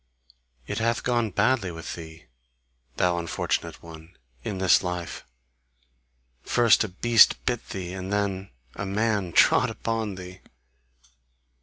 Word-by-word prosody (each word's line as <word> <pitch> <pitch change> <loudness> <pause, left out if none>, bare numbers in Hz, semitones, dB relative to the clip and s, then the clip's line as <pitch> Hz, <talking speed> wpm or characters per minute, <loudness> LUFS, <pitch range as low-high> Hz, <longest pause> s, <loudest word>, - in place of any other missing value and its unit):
It - - -3
hath 115 +1 0
gone 120 -3 +1
badly 105 +1 +1
with 80 -2 -7
thee, 80 -1 -10 0.7
thou 90 -1 +1
unfortunate 85 -1 -3
one, 80 +1 -13 0.3
in 100 - -4
this 95 -3 +4
life: 90 -2 -5 1.2
first 115 - +4
a - - -2
beast 110 +4 +4
bit 120 -2 -2
thee, 90 -2 -5
and 95 0 -6
then 100 -2 -1 0.2
a 100 - -5
man 100 -2 0
trod - - +5
upon 110 -3 -3
thee!" 90 0 -10
95 Hz, 125 wpm, -26 LUFS, 90-110 Hz, 1.2 s, trod